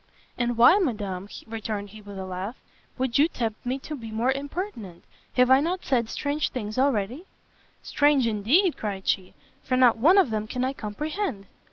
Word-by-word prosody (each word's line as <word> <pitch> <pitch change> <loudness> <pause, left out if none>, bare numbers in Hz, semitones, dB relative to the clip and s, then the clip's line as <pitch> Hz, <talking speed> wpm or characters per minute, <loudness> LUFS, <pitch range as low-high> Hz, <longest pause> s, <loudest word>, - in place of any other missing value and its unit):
"And 240 -1 -1
why, 245 - +7
Madam," 205 - -2 0.2
returned 215 -2 -5
he, 215 0 -12
with 200 -1 -10
a 190 - -5
laugh, 185 +5 -5 0.4
"would 260 0 0
you 300 - +6
tempt 225 -9 -4
me 250 +2 -1
to 305 - -6
be 230 -5 -8
more 225 +4 +1
impertinent? 275 - -5 0.3
have 250 0 +4
I 265 - +8
not 350 +5 -2
said 235 -4 +1
strange 290 +1 -1
things 215 -2 -4
already?" 260 - 0 0.6
"Strange 290 -3 +3
indeed," 240 - +2
cried 195 -3 -5
she, 185 -1 -1 0.3
"for 255 - -1
not 250 -3 +5
one 335 - +6
of 370 - +4
them 215 0 -2
can 250 +3 -2
I 265 - -1
comprehend!" 275 - -4
240 Hz, 180 wpm, -26 LUFS, 210-285 Hz, 0.6 s, I